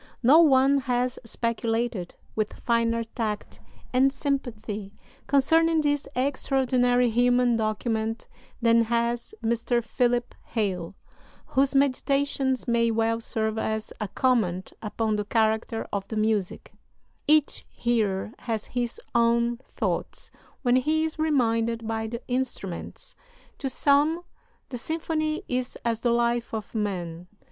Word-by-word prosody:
No 280 +7 +7
one 275 -3 +5
has 250 -1 -1
speculated 230 -3 -2 0.2
with 215 -1 -1
finer 230 -1 +1
tact 220 -2 -4 0.3
and 265 +2 +4
sympathy 220 -8 -3 0.3
concerning 320 +4 +4
this 290 -1 0
extraordinary 250 -2 +2
human 245 +1 +3
document 220 0 -1 0.4
than 230 0 +5
has 235 - -1
Mr. 235 +1 +1
Philip 245 +1 0
Hale, 190 -6 -2 0.5
whose 275 +1 +2
meditations 275 -1 +1
may 235 -1 +3
well 225 0 +1
serve 220 -1 -1
as 220 0 -2
a 210 - -1
comment 195 -6 0
upon 215 0 -1
the 210 - -2
character 220 +1 0
of 200 -1 -2
the 220 - -4
music: 215 -3 -1 0.5
"Each 300 -1 +3
hearer 215 -3 0
has 225 -3 -3
his 240 -1 -2
own 235 0 +3 0.2
thoughts - - -3 0.3
when 250 -1 +4
he 310 +5 +2
is 315 0 -5
'reminded 230 -6 +1
by 220 0 -2
the 235 +2 -6
instruments.' 245 -8 -3 0.5
To 270 - -2
some 290 +6 +3 0.5
this 245 -2 -5
symphony 310 0 -2
is 250 0 -2
as 230 -1 +1
the 240 - +1
life 235 0 +1
of 215 -2 -6
man. 180 -5 -3
235 Hz, 120 wpm, -26 LUFS, 220-260 Hz, 0.5 s, No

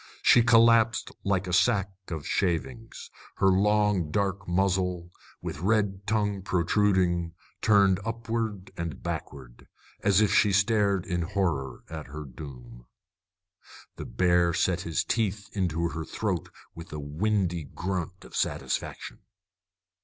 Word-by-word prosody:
She 120 - +7
collapsed 115 -1 +4
like 100 -1 0
a 90 - -4
sack 100 0 +3 0.2
of 80 -4 -5
shavings, 110 +7 -2 0.2
her 95 - +3
long 105 -3 +2
dark 95 +2 -1
muzzle, 90 -1 0 0.3
with - - -5
red 100 0 0
tongue 105 -2 0
protruding, 90 -2 +1 0.3
turned 100 -3 +4
upward 115 -3 -3
and 85 -3 -5
backward, 60 -4 -7 0.3
as 100 -1 +3
if 105 -2 +3
she 105 -2 +4
stared 100 -2 +2
in 90 -2 -1
horror 80 -8 -2
at 80 -4 -7
her 75 +2 -7
doom. - - -11 1.1
The - - -6
bear 85 +6 +2
set 90 -2 +1
his 85 -3 -1
teeth 105 -3 -1
into 85 -4 0
her 80 -1 -5
throat 95 0 -3 0.2
with 85 0 -11
a 75 - -5
windy 85 +2 -1
grunt 90 +3 -4
of - - -12
satisfaction. - - -3
95 Hz, 125 wpm, -27 LUFS, 85-105 Hz, 1.1 s, She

